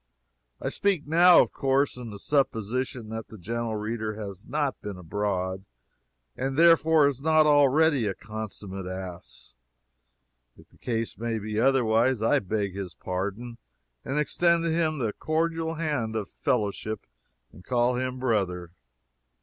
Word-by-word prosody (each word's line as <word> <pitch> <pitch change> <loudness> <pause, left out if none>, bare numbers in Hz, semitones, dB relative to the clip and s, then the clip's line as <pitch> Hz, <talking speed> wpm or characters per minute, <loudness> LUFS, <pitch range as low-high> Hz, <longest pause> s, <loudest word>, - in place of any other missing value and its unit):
I - - -2
speak 195 -7 0
now, 170 +4 +7
of - - -7
course, 135 0 +1
in 125 -2 -7
the 105 - -8
supposition 125 -1 -1
that 110 0 -6
the 110 - -12
gentle 115 +4 -3
reader 110 0 -3
has 100 -1 -8
not 145 -2 -1
been 105 -2 -6
abroad, 95 +1 -2 0.7
and 135 +1 -3
therefore 160 -2 +6
is 135 -2 -2
not 155 +1 +4
already 145 -3 +4
a 95 - -2
consummate 105 -3 -7
ass. 95 -7 -8 1.0
If - - -18
the - - -25
case 115 -2 -2
be 110 -2 -3
otherwise, 120 -2 +3
I 115 - +4
beg 100 -1 -2
his 95 -3 -6
pardon 100 +6 -4 0.4
and 135 - -3
extend 170 +3 +2
to 165 - 0
him 160 -2 +1
the 115 -6 -1
cordial 165 +1 -1
hand 145 -9 -2
of 105 -3 -3
fellowship 105 0 -2 0.5
and 85 +5 -15
call 125 +1 +1
him 130 +1 -2
brother. 95 -9 -1
115 Hz, 140 wpm, -27 LUFS, 105-145 Hz, 1.0 s, now